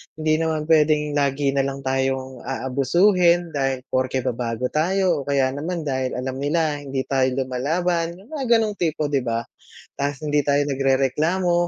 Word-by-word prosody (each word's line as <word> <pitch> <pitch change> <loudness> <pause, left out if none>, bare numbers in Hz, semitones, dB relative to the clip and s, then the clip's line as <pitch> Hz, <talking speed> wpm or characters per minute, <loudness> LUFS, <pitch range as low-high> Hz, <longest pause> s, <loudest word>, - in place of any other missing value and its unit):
hindi 155 0 +1
naman 160 -1 -1
pwedeng 150 -1 +3
lagi 140 -1 +1
na 135 0 +1
lang 135 0 -6
tayong 130 -1 -1
aabusuhin 170 +7 +2
dahil 135 -3 -1
porke 130 0 0
ba 130 - 0
bago 120 +1 -3
tayo 180 +1 +1
o - - -5
kaya 135 -2 +2
naman 160 +5 -4
dahil 130 -3 -2
alam 130 +1 -4
nila 150 +1 0
hindi 135 -2 -3
tayo 135 -1 +1 0.2
lumalaban. 165 +7 -1
'Yung 195 - -17
mga 265 -6 +2
ganong 220 -2 +1
tipo, 155 -3 -1
'di 140 - +2
ba? 115 -2 -2 0.5
Ta's 140 0 -2
hindi 150 -1 0
tayo 140 +1 +2
nagrereklamo, 140 +6 +1
145 Hz, 165 wpm, -22 LUFS, 130-165 Hz, 0.5 s, pwedeng